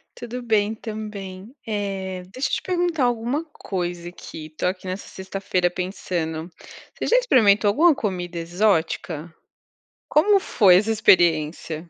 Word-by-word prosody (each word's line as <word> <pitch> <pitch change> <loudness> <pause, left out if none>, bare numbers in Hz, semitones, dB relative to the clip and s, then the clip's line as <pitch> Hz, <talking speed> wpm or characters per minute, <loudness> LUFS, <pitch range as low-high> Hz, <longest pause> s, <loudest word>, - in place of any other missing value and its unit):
Tudo 245 +1 -6
bem 215 -2 +1
também, 210 -1 -7
eh, 195 -3 -3
deixa 260 +6 -2
eu - - -5
te - - 0
perguntar 350 -6 0
alguma 245 +5 -1
coisa 175 - -5
aqui, 155 -3 -10
tô 155 - -2
aqui 185 +1 -3
nessa 185 +2 -5
sexta-feira 190 -2 -2
pensando, 175 -3 -4 0.4
você - - -3
já - - +5
experimentou 220 - +4
alguma 310 +10 +5
comida 180 -6 -3
exótica? 170 -2 0 0.8
Como 395 +6 +4
foi 195 - +5
essa 210 +5 +3
experiência? 170 -5 +2
195 Hz, 130 wpm, -23 LUFS, 175-225 Hz, 0.8 s, já